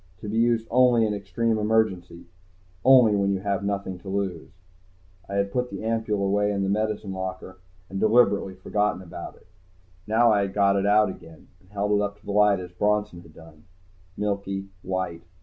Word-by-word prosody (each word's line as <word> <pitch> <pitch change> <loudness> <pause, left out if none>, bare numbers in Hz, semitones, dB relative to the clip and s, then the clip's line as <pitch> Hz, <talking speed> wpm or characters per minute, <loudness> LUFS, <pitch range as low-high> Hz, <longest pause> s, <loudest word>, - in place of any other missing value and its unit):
"To - - -7
be 110 +2 -1
used 115 -1 +2
only 125 -2 +4
in 105 - -1
extreme 105 +3 -1
emergency. 105 -6 0 0.6
Only 125 -5 +6
when 100 -1 +1
you 95 - -3
have 100 -1 -2
nothing 100 -2 -3
to 95 - -10
lose." 95 -4 -3 0.8
I 100 - -4
had 100 0 0
put 125 +3 -1
the 100 +1 -7
ampule 110 -3 -1
away 105 +1 +1
in 100 -1 -1
the 95 - -1
medicine 105 -1 -2
locker 95 0 -6 0.3
and 95 +1 -5
deliberately 105 -4 +3
forgotten 105 +1 -1
about 85 - -9
it. - - -23 0.6
Now 115 +2 +4
I 100 -2 +2
got 100 0 +2
it 100 0 +1
out 105 0 +4
again 80 -3 -12
and 95 - -26
held 105 0 -2
it 105 0 +3
up 100 0 -3
to - - -25
the - - -4
light 105 -1 +4
as 90 -1 -8
Bronson 105 -1 -1
had 80 -3 -18
done. 80 -2 -16 0.5
Milky, 100 -1 -3
white. 95 -3 -3
100 Hz, 185 wpm, -25 LUFS, 95-105 Hz, 0.8 s, Only